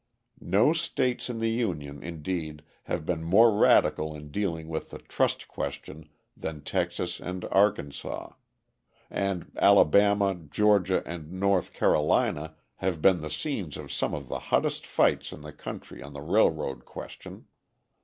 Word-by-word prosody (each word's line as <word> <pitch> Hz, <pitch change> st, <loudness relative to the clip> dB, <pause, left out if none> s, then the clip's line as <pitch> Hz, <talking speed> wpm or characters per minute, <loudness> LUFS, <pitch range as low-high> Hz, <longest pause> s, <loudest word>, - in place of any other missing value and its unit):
No 110 Hz, +11 st, +5 dB
states 135 Hz, -7 st, -1 dB
in 120 Hz, -, -3 dB
the 115 Hz, 0 st, 0 dB
Union, 75 Hz, -, -2 dB
indeed, 80 Hz, -2 st, -5 dB, 0.2 s
have 80 Hz, -3 st, -3 dB
been 80 Hz, -1 st, -2 dB
more 105 Hz, +6 st, +5 dB
radical 80 Hz, -6 st, +4 dB
in 75 Hz, -1 st, -10 dB
dealing 85 Hz, -4 st, -2 dB
with 80 Hz, -1 st, -4 dB
the -, -, -8 dB
trust -, -, -1 dB
question 75 Hz, 0 st, -6 dB, 0.3 s
than 75 Hz, -2 st, -6 dB
Texas 90 Hz, 0 st, -2 dB
and 90 Hz, 0 st, -5 dB
Arkansas; 95 Hz, -8 st, 0 dB, 0.8 s
and 95 Hz, -3 st, -2 dB
Alabama, 100 Hz, +3 st, +5 dB
Georgia, 95 Hz, +3 st, +2 dB
and 80 Hz, -2 st, -7 dB
North 95 Hz, -1 st, +1 dB
Carolina 75 Hz, +1 st, +1 dB, 0.2 s
have 90 Hz, -3 st, -1 dB
been 90 Hz, +1 st, +4 dB
the 75 Hz, -, -5 dB
scenes 95 Hz, -, -3 dB
of -, -, -8 dB
some -, -, -1 dB
of 70 Hz, -3 st, -7 dB
the -, -, -3 dB
hottest -, -, +1 dB
fights -, -, +2 dB
in -, -, -10 dB
the 75 Hz, 0 st, -9 dB
country -, -, -8 dB
on 70 Hz, -, -10 dB
the 70 Hz, -, -7 dB
railroad 80 Hz, -, +1 dB
question. -, -, -10 dB
85 Hz, 145 wpm, -28 LUFS, 75-100 Hz, 0.8 s, No